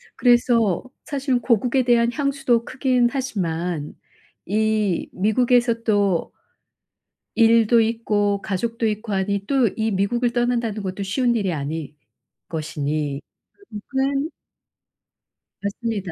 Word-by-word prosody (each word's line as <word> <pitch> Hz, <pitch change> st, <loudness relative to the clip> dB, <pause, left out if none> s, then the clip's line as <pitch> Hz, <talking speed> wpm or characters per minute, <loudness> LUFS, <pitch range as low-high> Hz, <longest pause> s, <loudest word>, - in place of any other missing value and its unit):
그래서 240 Hz, -5 st, +3 dB, 0.2 s
사실은 270 Hz, -3 st, -1 dB
고국에 245 Hz, +3 st, +2 dB
대한 235 Hz, -1 st, +3 dB
향수도 275 Hz, -5 st, 0 dB
크긴 255 Hz, -2 st, +1 dB
하지만 175 Hz, -, -3 dB, 0.5 s
이 215 Hz, -2 st, 0 dB
미국에서 235 Hz, +3 st, +2 dB
또 200 Hz, -5 st, +1 dB, 1.0 s
일도 230 Hz, 0 st, +5 dB
있고 210 Hz, -3 st, 0 dB
가족도 225 Hz, +3 st, -2 dB
있고 215 Hz, 0 st, -3 dB
하니 200 Hz, +1 st, -1 dB
또 265 Hz, -3 st, +3 dB
이 220 Hz, 0 st, 0 dB
미국을 235 Hz, +5 st, 0 dB
떠난다는 240 Hz, -4 st, -1 dB
것도 190 Hz, +1 st, -4 dB
쉬운 240 Hz, +5 st, +1 dB
일이 195 Hz, -6 st, 0 dB
아닐 150 Hz, +1 st, -5 dB, 0.5 s
것이니 150 Hz, -2 st, -3 dB, 0.4 s
결국은 275 Hz, -, -2 dB, 1.3 s
맞습니다. 200 Hz, -2 st, -3 dB
220 Hz, 235 characters per minute, -22 LUFS, 195-245 Hz, 1.3 s, 일도